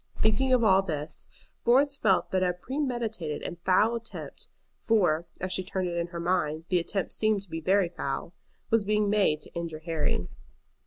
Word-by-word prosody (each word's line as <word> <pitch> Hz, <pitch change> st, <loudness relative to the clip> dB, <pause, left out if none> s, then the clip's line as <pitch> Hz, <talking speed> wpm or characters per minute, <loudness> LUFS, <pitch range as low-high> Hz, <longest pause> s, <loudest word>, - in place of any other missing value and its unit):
Thinking 220 Hz, +5 st, +2 dB
of 250 Hz, -2 st, +4 dB
all 190 Hz, -3 st, +6 dB
this, 155 Hz, -5 st, -5 dB, 0.4 s
Florence 275 Hz, +4 st, +4 dB
felt 195 Hz, -8 st, +2 dB
that 185 Hz, -, +1 dB
a 180 Hz, -1 st, +2 dB
premeditated 225 Hz, -, -3 dB
and 175 Hz, -, -5 dB
foul 210 Hz, +5 st, +4 dB
attempt, 230 Hz, -1 st, -7 dB, 0.3 s
for, 175 Hz, -7 st, +2 dB
as 185 Hz, 0 st, -2 dB
she 185 Hz, -, 0 dB
turned 185 Hz, -1 st, -2 dB
it 170 Hz, -, -4 dB
in 170 Hz, 0 st, -1 dB
her 170 Hz, -1 st, -7 dB
mind, 165 Hz, -3 st, 0 dB
the 180 Hz, -, +3 dB
attempt 185 Hz, +3 st, -3 dB
seemed 215 Hz, -2 st, +1 dB
to 195 Hz, -, -13 dB
be 165 Hz, -, -4 dB
very 190 Hz, +2 st, +3 dB
foul, 170 Hz, 0 st, -4 dB, 0.4 s
was 225 Hz, -2 st, +4 dB
being 210 Hz, 0 st, +1 dB
made 195 Hz, -8 st, +2 dB
to -, -, -12 dB
injure 165 Hz, -2 st, -5 dB
Harry. 155 Hz, -, -1 dB
185 Hz, 180 wpm, -28 LUFS, 170-215 Hz, 0.4 s, all